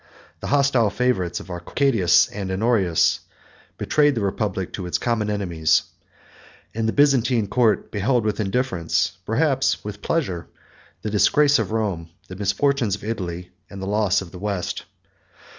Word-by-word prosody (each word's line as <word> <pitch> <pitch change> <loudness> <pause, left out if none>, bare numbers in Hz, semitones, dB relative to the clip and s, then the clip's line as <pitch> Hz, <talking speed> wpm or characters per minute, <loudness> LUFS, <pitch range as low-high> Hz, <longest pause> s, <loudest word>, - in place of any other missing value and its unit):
The - - -6
hostile 135 -6 +3
favorites 100 -6 0
of 95 - -10
Arcadius 95 +3 +2
and 100 -2 -5
Honorius 95 -3 +2 0.6
betrayed 145 -2 +2
the 115 - -1
republic 100 -2 -2
to 90 -3 -5
its 90 - 0
common 115 -3 -1
enemies; 85 -6 +1 0.9
and 110 0 -1
the - - +1
Byzantine 130 -5 +3
court 110 +1 +1
beheld 115 +3 +1
with 105 -1 -1
indifference, 100 -5 -1
perhaps 135 +3 +1
with 105 -1 -7
pleasure, 95 - -2 0.6
the 105 - -3
disgrace 145 +6 +4
of 110 -2 -2
Rome, 100 -7 -2 0.2
the 95 - -7
misfortunes 105 +3 +1
of - - -14
Italy, 90 -5 -5 0.2
and 100 - -9
the 95 - -5
loss 100 -1 +1
of 85 - -13
the 90 - -10
West. 100 -2 -3
105 Hz, 145 wpm, -22 LUFS, 95-125 Hz, 0.9 s, disgrace